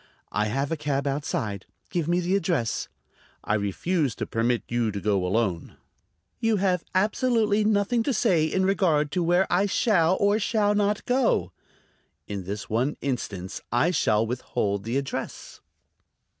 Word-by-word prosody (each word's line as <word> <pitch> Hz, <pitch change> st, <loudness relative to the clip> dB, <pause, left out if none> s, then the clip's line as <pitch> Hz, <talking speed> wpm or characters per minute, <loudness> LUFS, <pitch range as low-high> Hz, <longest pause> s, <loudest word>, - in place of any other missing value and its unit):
"I 105 Hz, -, 0 dB
have 135 Hz, +7 st, -1 dB
a 165 Hz, -, 0 dB
cab 145 Hz, -2 st, -1 dB
outside. 135 Hz, -, -2 dB, 0.2 s
Give 170 Hz, -6 st, -1 dB
me 175 Hz, +1 st, +2 dB
the 180 Hz, +2 st, +1 dB
address." 165 Hz, -, 0 dB, 0.6 s
"I -, -, -1 dB
refuse 120 Hz, -, 0 dB
to -, -, -3 dB
permit 115 Hz, +1 st, 0 dB
you 120 Hz, -2 st, 0 dB
to 100 Hz, -1 st, -4 dB
go 100 Hz, -2 st, +1 dB
alone." 95 Hz, -2 st, -1 dB, 0.6 s
"You 225 Hz, -2 st, +2 dB
have 185 Hz, -3 st, +1 dB
absolutely 215 Hz, +1 st, +2 dB
nothing 215 Hz, +2 st, +2 dB
to -, -, +1 dB
say 170 Hz, -5 st, +3 dB
in 190 Hz, +4 st, 0 dB
regard 160 Hz, -7 st, +2 dB
to 180 Hz, -, 0 dB
where 175 Hz, +3 st, +3 dB
I 195 Hz, +3 st, +3 dB
shall 190 Hz, -4 st, +2 dB
or 205 Hz, +1 st, +3 dB
shall 210 Hz, -1 st, +1 dB
not 205 Hz, 0 st, 0 dB
go." 245 Hz, -, +1 dB, 0.7 s
"In 100 Hz, -3 st, -5 dB
this 100 Hz, +2 st, -5 dB
one 125 Hz, +7 st, 0 dB
instance. 100 Hz, -9 st, -4 dB
I 120 Hz, +9 st, +3 dB
shall 110 Hz, -10 st, +2 dB
withhold 105 Hz, -4 st, -2 dB
the 120 Hz, +4 st, -1 dB
address." 140 Hz, -1 st, -5 dB
150 Hz, 155 wpm, -26 LUFS, -, 0.7 s, say